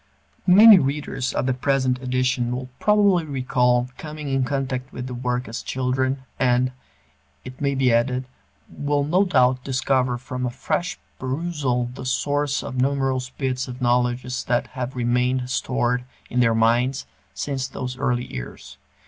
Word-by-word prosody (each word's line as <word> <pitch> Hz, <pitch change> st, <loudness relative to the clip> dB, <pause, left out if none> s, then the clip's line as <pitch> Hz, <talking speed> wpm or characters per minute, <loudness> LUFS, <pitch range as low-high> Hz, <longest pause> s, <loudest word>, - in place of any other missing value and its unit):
Many 205 Hz, +2 st, +9 dB
readers 135 Hz, -2 st, -2 dB
of -, -, -1 dB
the 130 Hz, -, +1 dB
present 130 Hz, -1 st, 0 dB
edition 130 Hz, -1 st, 0 dB
will 130 Hz, 0 st, -6 dB
probably 205 Hz, -4 st, +4 dB
recall 125 Hz, -3 st, +1 dB
coming 150 Hz, -1 st, -6 dB
in 135 Hz, -1 st, +1 dB
contact 130 Hz, -1 st, -2 dB
with 125 Hz, -, -6 dB
the 130 Hz, -, -6 dB
work 125 Hz, 0 st, -2 dB
as 115 Hz, -, -5 dB
children, 130 Hz, +1 st, -1 dB, 0.2 s
and, 125 Hz, 0 st, +2 dB, 0.7 s
it 130 Hz, +2 st, -10 dB
may 140 Hz, -1 st, +1 dB
be 130 Hz, -3 st, +3 dB
added, 125 Hz, +2 st, +1 dB, 0.4 s
will 145 Hz, 0 st, -1 dB
no 175 Hz, +7 st, +3 dB
doubt 130 Hz, -6 st, +3 dB
discover 130 Hz, -1 st, +1 dB
from 125 Hz, 0 st, -5 dB
a 125 Hz, -, 0 dB
fresh 135 Hz, +8 st, -2 dB, 0.2 s
perusal 130 Hz, -3 st, -1 dB
the 130 Hz, -1 st, -7 dB
source 145 Hz, +1 st, 0 dB
of 130 Hz, -, -6 dB
numerous 135 Hz, -1 st, 0 dB
bits 130 Hz, -1 st, -3 dB
of 125 Hz, 0 st, -7 dB
knowledge 125 Hz, 0 st, +1 dB, 0.2 s
that 120 Hz, 0 st, +1 dB
have 130 Hz, 0 st, -4 dB
remained 125 Hz, +1 st, +1 dB
stored 125 Hz, -1 st, 0 dB, 0.3 s
in 125 Hz, -, 0 dB
their 115 Hz, -2 st, +4 dB
minds 120 Hz, +4 st, +2 dB, 0.3 s
since 135 Hz, -2 st, -2 dB
those 125 Hz, 0 st, -5 dB
early 125 Hz, -2 st, -1 dB
years. 60 Hz, -1 st, -9 dB
130 Hz, 150 wpm, -23 LUFS, 125-135 Hz, 0.7 s, Many